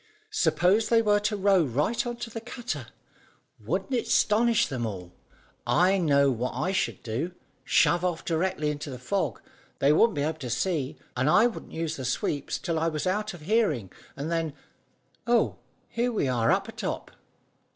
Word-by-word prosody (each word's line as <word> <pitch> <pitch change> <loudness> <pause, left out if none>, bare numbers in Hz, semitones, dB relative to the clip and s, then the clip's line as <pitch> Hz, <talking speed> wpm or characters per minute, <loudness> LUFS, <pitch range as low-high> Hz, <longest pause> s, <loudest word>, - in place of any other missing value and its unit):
"Suppose 215 - +2
they 230 -1 +4
were 205 -1 +4
to 210 0 -1
row 195 -2 +4
right 150 - 0
on 240 - -3
to 240 -1 -6
the 225 - -6
cutter! 245 +1 -5 0.7
Wouldn't 270 - -3
it 240 - 0
'stonish 235 +2 +3
them 130 -4 -4
all? 90 -5 -5 0.5
I 190 +2 +4
know 140 -5 +4
what 125 +1 -2
I 155 +9 0
should 120 - -1
do. 135 +11 -3 0.3
Shove 175 0 +3
off 175 -2 -1
directly 165 -2 0
into 145 +1 -6
the 130 - -6
fog. 145 - -2 0.4
They 140 +2 +4
wouldn't 225 +7 +4
be 145 - 0
able 155 +1 -2
to 130 -4 -5
see, 145 +3 -1 0.2
and 130 +4 +1
I 215 +8 +6
wouldn't 240 - -4
use 160 -1 -3
the 130 - -5
sweeps 140 +3 -1
till 165 -3 -2
I 165 - +1
was 155 0 -2
out 210 +2 -1
of 170 - -13
hearing, 155 - +1 0.3
and 150 +4 -3
then 165 -3 -1 0.7
oh, 240 0 +2 0.3
here 240 +1 -1
we 210 - 0
are 120 -3 +2
up - - +1
atop!" - - -5
165 Hz, 180 wpm, -27 LUFS, 140-210 Hz, 0.7 s, I